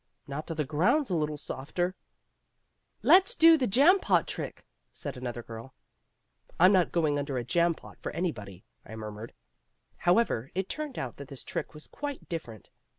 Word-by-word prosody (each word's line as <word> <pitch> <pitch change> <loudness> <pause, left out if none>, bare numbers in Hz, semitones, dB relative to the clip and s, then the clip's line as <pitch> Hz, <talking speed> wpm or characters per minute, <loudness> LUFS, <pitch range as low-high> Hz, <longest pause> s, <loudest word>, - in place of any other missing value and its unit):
"Not 145 +2 -6
till 165 - -4
the 150 -1 -1
ground's 185 - +2
a - - +2
little 150 -2 -1
softer." 175 +7 -3 1.1
"Let's 380 +1 +6
do 330 0 +8
the 265 -5 0
jam 290 - +5
pot - - +2
trick," - - -6 0.3
said - - -6
another 120 -2 -5
girl. 115 +3 -10 0.8
"I'm 185 +3 +7
not 185 -3 +3
going 155 -4 +1
under 140 -2 -3
a 120 - -1
jam 170 +6 +2
pot - - -14
for - - -4
anybody," 105 - -4 0.2
I 110 - -10
murmured. 110 +1 -7 0.7
However, 175 - +2
it 190 0 -1
turned 300 -4 -4
out 125 -3 -4
that 140 - -9
this 135 -1 -9
trick - - -5
was 150 - -6
quite 290 -1 -6
different. 120 - -7
155 Hz, 170 wpm, -29 LUFS, 125-190 Hz, 1.1 s, do